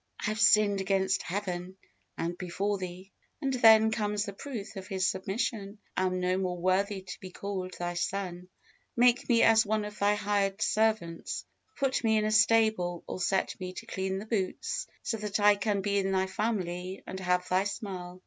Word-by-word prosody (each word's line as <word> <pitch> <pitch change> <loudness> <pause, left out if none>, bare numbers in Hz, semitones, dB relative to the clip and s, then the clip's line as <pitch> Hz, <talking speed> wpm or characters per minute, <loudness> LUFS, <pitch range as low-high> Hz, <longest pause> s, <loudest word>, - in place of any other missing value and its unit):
"I - - -4
have 215 +1 -2
sinned 205 -1 +5
against 190 0 +1
Heaven, 185 -1 -4 0.4
and 170 +1 -2
before 195 +3 -2
thee;" 185 +1 -7 0.3
and 275 -3 -1
then 220 -3 +6
comes 210 -1 -1
the 200 - -6
proof 220 -2 -7
of 190 -1 -7
his 190 -1 -1
submission, 200 +2 -2 0.2
"and 185 0 +1
am - - -1
no 180 0 +1
more 180 -2 -2
worthy 190 +2 0
to 180 - -8
be 185 - -8
called 185 -1 -5
thy 175 0 -3
son: 180 0 -3 0.5
make 245 +2 +3
me 235 -1 +5
as 225 0 +6
one 215 -1 -1
of 210 0 -8
thy 205 +1 +3
hired 200 -1 0
servants" 215 -7 0 0.3
put 270 -2 0
me 220 -1 +3
in 215 - +1
a 215 - 0
stable, 215 -5 +3
or 185 - -5
set 190 +1 +1
me 185 -1 -5
to - - -8
clean 190 0 -3
the 200 - -6
boots, 205 -5 -2 0.2
so 225 - -1
that 210 -1 -2
I 205 0 +6
can 200 -1 0
be 200 0 +1
in 195 0 0
thy 190 0 +2
family 190 -3 -3
and 190 - -6
have 180 0 0
thy 185 +2 +2
smile. 185 -3 -5
195 Hz, 190 wpm, -29 LUFS, 185-215 Hz, 0.5 s, then